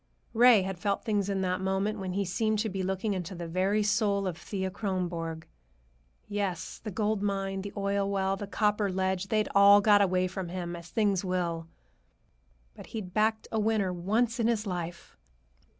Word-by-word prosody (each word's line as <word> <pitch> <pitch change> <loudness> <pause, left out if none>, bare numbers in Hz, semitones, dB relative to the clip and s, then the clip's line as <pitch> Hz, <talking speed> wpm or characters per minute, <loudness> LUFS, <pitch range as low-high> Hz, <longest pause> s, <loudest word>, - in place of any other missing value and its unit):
Ray 235 -3 +6
had 190 -1 -4
felt 200 +2 -1
things 205 -3 0
in 195 -1 0
that 185 0 -1
moment 195 +3 -1
when 185 -2 -4
he 200 +1 0
seemed 215 +4 0
to 220 +1 0
be 190 -1 -3
looking 190 +3 -1
into 185 -1 -4
the 170 -1 -6
very 190 +5 +1
soul 205 -2 +1
of 185 -3 -2
Thea 190 +3 -4
Kronborg. 175 -5 -3 0.8
Yes, 200 -4 -3
the 215 - -4
gold 210 +1 -1
mine, 195 -1 -1
the 200 +1 -6
oil 200 0 0
well, 195 -1 0
the 200 +1 -6
copper 210 +1 +1
ledge, 190 0 -1
they'd 215 +1 +1
all 200 +1 +8
got 205 0 +5
away 185 -2 +2
from 185 -1 -4
him, 175 -1 -4
as 170 0 -10
things 205 -3 +1
will; 175 -3 -2 1.1
but - - -12
he'd 195 -5 -6
backed 220 +1 +1
a 220 - 0
winner 210 -3 +1
once 220 +7 0
in 230 - +2
his 225 -2 0
life! 175 -3 -5
195 Hz, 180 wpm, -29 LUFS, 185-210 Hz, 1.1 s, all